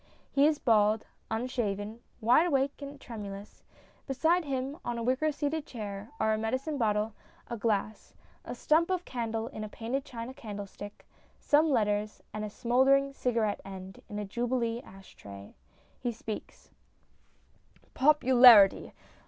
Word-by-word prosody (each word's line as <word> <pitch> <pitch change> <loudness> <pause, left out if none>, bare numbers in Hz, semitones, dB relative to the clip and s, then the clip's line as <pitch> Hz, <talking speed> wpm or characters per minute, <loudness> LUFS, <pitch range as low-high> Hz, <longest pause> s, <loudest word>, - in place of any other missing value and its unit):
He 280 +1 +4
is 310 -1 +2
bald, 215 -4 +3 0.2
unshaven, 220 -2 -2 0.2
wide 250 +10 +5
awake 280 -2 0
and 280 0 -8
tremulous. 205 -4 -8 0.5
Beside 320 +6 +2
him, 275 +2 -3
on 240 -1 -3
a 230 - -3
wicker 260 +6 +1
seated 295 +1 -3
chair, 205 -3 -7
are 220 - +2
a 215 - -1
medicine 260 +7 -2
bottle, 215 -1 +1 0.4
a - - -1
glass, 215 -1 -2 0.3
a - - -6
stump 325 +3 +2
of 365 -1 -1
candle 225 -2 -3
in 215 -6 -7
a 215 - -6
painted 240 +6 -3
china 235 0 -7
candlestick, 205 -5 -9 0.3
some 305 +2 +3
letters, 210 -4 0
and 215 - -4
a 210 - -4
smouldering 265 +5 +2
cigarette 230 -6 0
end 190 -1 -9
in 210 - -6
a 210 - -3
Jubilee 235 +2 -1
ash 195 -3 -15
tray. 100 0 -11 0.5
He 245 - -2
speaks: 220 -1 -8 1.2
POPULARITY 255 -7 +6
235 Hz, 140 wpm, -30 LUFS, 210-275 Hz, 1.2 s, POPULARITY